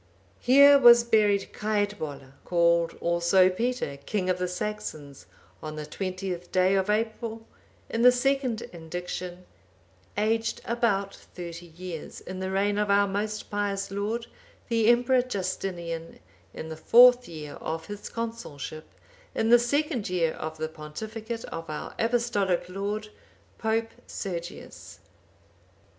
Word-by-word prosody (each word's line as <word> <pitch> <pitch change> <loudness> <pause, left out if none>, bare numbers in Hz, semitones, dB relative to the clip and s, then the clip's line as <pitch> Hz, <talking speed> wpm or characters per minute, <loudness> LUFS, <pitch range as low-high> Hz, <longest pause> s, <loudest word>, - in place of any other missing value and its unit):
"Here 280 +3 +7
was 240 -2 +8
buried 210 -4 +2
Caedwalla, 205 -11 -2
called 170 -1 +2
also 170 +2 +4
Peter, 225 - -2
king 185 +6 -1
of 180 - -2
the 180 - 0
Saxons, 180 - -5 0.3
on 155 0 -6
the 155 0 -5
twentieth 185 +1 -5
day 185 +1 +3
of 195 0 +1
April, 225 +1 -2 0.4
in 230 - -2
the 250 +1 +8
second 255 -2 0
indiction, 175 +2 -6 0.7
aged 225 +2 0
about 210 -5 0
thirty 175 -1 -9
years, 170 -1 -8
in 185 0 -7
the 190 0 -3
reign 200 +2 +1
of 210 -1 0
our 200 0 +4
most 210 +3 -3
pious 200 -1 -1
lord, 210 +4 -2 0.4
the 230 -2 +2
Emperor 245 +2 +4
Justinian,(800) 180 -7 -4 0.4
in 160 - -6
the 160 - -6
fourth 245 +6 +7
year 155 -3 -8
of 160 0 -4
his 205 0 -7
consulship, 225 -10 -6 0.4
in 225 +1 +1
the 240 - +9
second 265 - 0
year 170 -3 +1
of 160 0 -6
the 155 0 -2
pontificate 220 +9 -7
of 165 -1 -7
our 155 - -5
Apostolic 225 -7 +1
lord, 205 +3 -3 0.5
Pope 225 0 0 0.2
Sergius." 175 -3 -7
200 Hz, 130 wpm, -27 LUFS, 170-225 Hz, 0.7 s, the